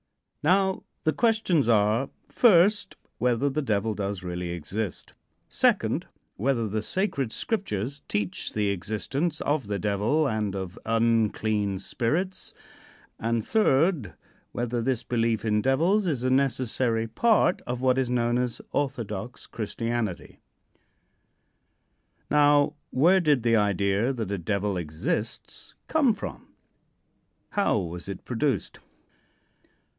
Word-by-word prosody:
Now, 190 Hz, 0 st, +3 dB, 0.2 s
the 155 Hz, -, +2 dB
questions 215 Hz, -, +2 dB
are, 110 Hz, +4 st, +3 dB, 0.2 s
first, 205 Hz, -2 st, +4 dB, 0.2 s
whether 125 Hz, +2 st, +2 dB
the 155 Hz, +3 st, -1 dB
Devil 110 Hz, -4 st, 0 dB
does 100 Hz, -2 st, -4 dB
really 90 Hz, 0 st, -4 dB
exist; 90 Hz, +5 st, -5 dB, 0.3 s
second, -, -, +1 dB, 0.3 s
whether 115 Hz, 0 st, 0 dB
the 105 Hz, +1 st, -2 dB
sacred 140 Hz, -, -1 dB
Scriptures 140 Hz, -, -3 dB
teach 100 Hz, -3 st, -3 dB
the 105 Hz, -1 st, +1 dB
existence 120 Hz, -, -2 dB
of 145 Hz, -6 st, 0 dB
the 100 Hz, -1 st, -1 dB
Devil 105 Hz, +10 st, +1 dB
and 105 Hz, -4 st, -1 dB
of 95 Hz, -2 st, -5 dB
unclean 110 Hz, -3 st, +1 dB
spirits, 165 Hz, -, -2 dB, 0.6 s
and 115 Hz, -1 st, -1 dB
third, 165 Hz, -, +2 dB, 0.4 s
whether 120 Hz, 0 st, -2 dB
this 125 Hz, 0 st, -1 dB
belief 115 Hz, -2 st, 0 dB
in 105 Hz, -1 st, +2 dB
devils 170 Hz, -, +2 dB
is 135 Hz, -7 st, -1 dB
a 130 Hz, -, +1 dB
necessary 125 Hz, -3 st, +1 dB
part 220 Hz, -, +2 dB
of 125 Hz, 0 st, -2 dB
what 130 Hz, 0 st, +2 dB
is 130 Hz, -2 st, 0 dB
known 120 Hz, 0 st, +1 dB
as 125 Hz, -2 st, -2 dB
"orthodox 120 Hz, -5 st, -3 dB
Christianity." 115 Hz, -2 st, -4 dB, 1.9 s
Now, 145 Hz, 0 st, +4 dB, 0.2 s
where 170 Hz, +9 st, +4 dB
did 150 Hz, -8 st, +2 dB
the 115 Hz, -1 st, +3 dB
idea 100 Hz, +2 st, +2 dB
that 110 Hz, -6 st, -4 dB
a 100 Hz, -, -2 dB
Devil 100 Hz, +2 st, -1 dB
exists 85 Hz, +6 st, -4 dB
come 275 Hz, -8 st, +3 dB
from? 200 Hz, -, -7 dB, 1.0 s
How 200 Hz, -, +2 dB
was 90 Hz, -1 st, -5 dB
it 95 Hz, -, -7 dB
produced? 125 Hz, -2 st, -1 dB
115 Hz, 120 wpm, -26 LUFS, 105-145 Hz, 1.9 s, first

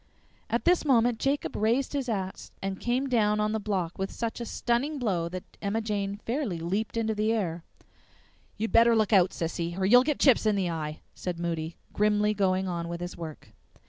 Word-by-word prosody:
At -, -, -1 dB
this 355 Hz, 0 st, +4 dB
moment 240 Hz, -5 st, +3 dB
Jacob 280 Hz, +1 st, -1 dB
raised 235 Hz, +7 st, +1 dB
his 275 Hz, -3 st, -2 dB
axe 190 Hz, -4 st, -4 dB
and 195 Hz, -1 st, -4 dB
came 250 Hz, +3 st, 0 dB
down 210 Hz, -4 st, +2 dB
on 210 Hz, 0 st, +1 dB
the 220 Hz, -, 0 dB
block 190 Hz, -5 st, -2 dB
with 195 Hz, 0 st, -1 dB
such 230 Hz, 0 st, -4 dB
a 235 Hz, -, -4 dB
stunning 260 Hz, +6 st, 0 dB
blow 185 Hz, -10 st, -1 dB
that 185 Hz, +1 st, -6 dB, 0.2 s
Emma 205 Hz, +2 st, 0 dB
Jane 205 Hz, -2 st, -2 dB
fairly 235 Hz, -, -1 dB
leaped 195 Hz, +8 st, -2 dB
into 220 Hz, -1 st, +1 dB
the 215 Hz, +1 st, +1 dB
air. 175 Hz, -7 st, -1 dB, 0.9 s
"You'd 225 Hz, +2 st, -2 dB
better 230 Hz, 0 st, +6 dB
look 215 Hz, -1 st, +2 dB
out, 185 Hz, -2 st, +6 dB
Sissy, 170 Hz, +1 st, -3 dB
or 190 Hz, -, 0 dB
you'll 245 Hz, +6 st, +7 dB
git 290 Hz, +2 st, 0 dB
chips 255 Hz, -5 st, +5 dB
in 210 Hz, -, +3 dB
the 185 Hz, -3 st, 0 dB
eye!" 155 Hz, -2 st, -4 dB
said 180 Hz, -2 st, -4 dB
Moody, 165 Hz, -1 st, -3 dB, 0.2 s
grimly 210 Hz, 0 st, +2 dB
going 190 Hz, -2 st, +1 dB
on 170 Hz, -2 st, -3 dB
with 170 Hz, 0 st, -4 dB
his 175 Hz, 0 st, -5 dB
work. 160 Hz, -3 st, -8 dB
210 Hz, 200 wpm, -28 LUFS, 180-230 Hz, 0.9 s, you'll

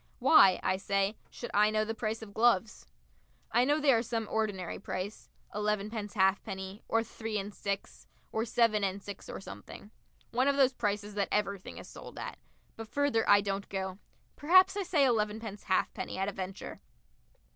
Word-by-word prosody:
Why, 195 Hz, -, +6 dB
I 185 Hz, -, +1 dB
say, 195 Hz, +1 st, 0 dB
should 240 Hz, -, -7 dB
I 210 Hz, +1 st, +5 dB
know 215 Hz, 0 st, +1 dB
the 225 Hz, -, -2 dB
price 225 Hz, 0 st, -3 dB
of 200 Hz, -2 st, -11 dB
gloves? 225 Hz, -2 st, +2 dB, 0.6 s
I 240 Hz, +2 st, +4 dB
know 290 Hz, +4 st, +2 dB
they 290 Hz, -3 st, +5 dB
are 225 Hz, -, +3 dB
some 225 Hz, -2 st, -3 dB
ordinary 205 Hz, -5 st, -2 dB
price 190 Hz, +4 st, -5 dB, 0.2 s
elevenpence 210 Hz, 0 st, -2 dB
halfpenny, 190 Hz, 0 st, 0 dB
or 225 Hz, 0 st, +2 dB
three 225 Hz, -1 st, -5 dB
and 200 Hz, +1 st, -4 dB
six, 200 Hz, -1 st, -5 dB, 0.2 s
or 220 Hz, -, 0 dB
seven 230 Hz, -3 st, +2 dB
and 195 Hz, 0 st, -1 dB
six, 205 Hz, -1 st, -8 dB
or -, -, -5 dB
something 190 Hz, -, -10 dB, 0.4 s
one 255 Hz, +3 st, +2 dB
of 280 Hz, -, +3 dB
those 265 Hz, -2 st, +5 dB
prices 210 Hz, -2 st, -2 dB
that 200 Hz, -1 st, -1 dB
everything 200 Hz, -2 st, -2 dB
is -, -, -9 dB
sold -, -, -11 dB
at -, -, -6 dB, 0.4 s
but 225 Hz, 0 st, -8 dB
further 285 Hz, -3 st, +1 dB
I 205 Hz, -, +7 dB
don't 200 Hz, 0 st, -3 dB
go. 190 Hz, 0 st, -4 dB, 0.4 s
Perhaps 370 Hz, +6 st, +6 dB
I 405 Hz, -, -1 dB
say 330 Hz, -7 st, +3 dB
elevenpence 215 Hz, -3 st, -1 dB
halfpenny 190 Hz, 0 st, -1 dB
at 195 Hz, +1 st, 0 dB
a -, -, -1 dB
venture. 190 Hz, 0 st, -7 dB
210 Hz, 175 wpm, -31 LUFS, 195-230 Hz, 0.6 s, I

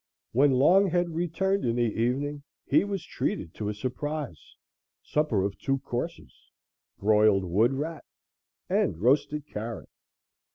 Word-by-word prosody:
When 135 Hz, +3 st, +4 dB
Longhead 175 Hz, +4 st, +4 dB
returned 175 Hz, +4 st, 0 dB
in 115 Hz, -1 st, 0 dB
the 120 Hz, -, +2 dB
evening 125 Hz, +6 st, -1 dB, 0.2 s
he -, -, +4 dB
was 200 Hz, -4 st, -4 dB
treated 85 Hz, -, -3 dB
to 105 Hz, -1 st, -4 dB
a 105 Hz, -, -3 dB
surprise 130 Hz, -, -5 dB, 0.5 s
supper 150 Hz, -11 st, +1 dB
of 100 Hz, 0 st, -3 dB
two 135 Hz, 0 st, 0 dB
courses, 120 Hz, -, -5 dB, 0.6 s
broiled 105 Hz, -1 st, +4 dB
wood 105 Hz, +9 st, +2 dB
rat 155 Hz, +3 st, -4 dB, 0.6 s
and -, -, +1 dB
roasted 140 Hz, -, +2 dB
carrot. 115 Hz, -4 st, -6 dB
130 Hz, 125 wpm, -27 LUFS, 110-155 Hz, 0.6 s, When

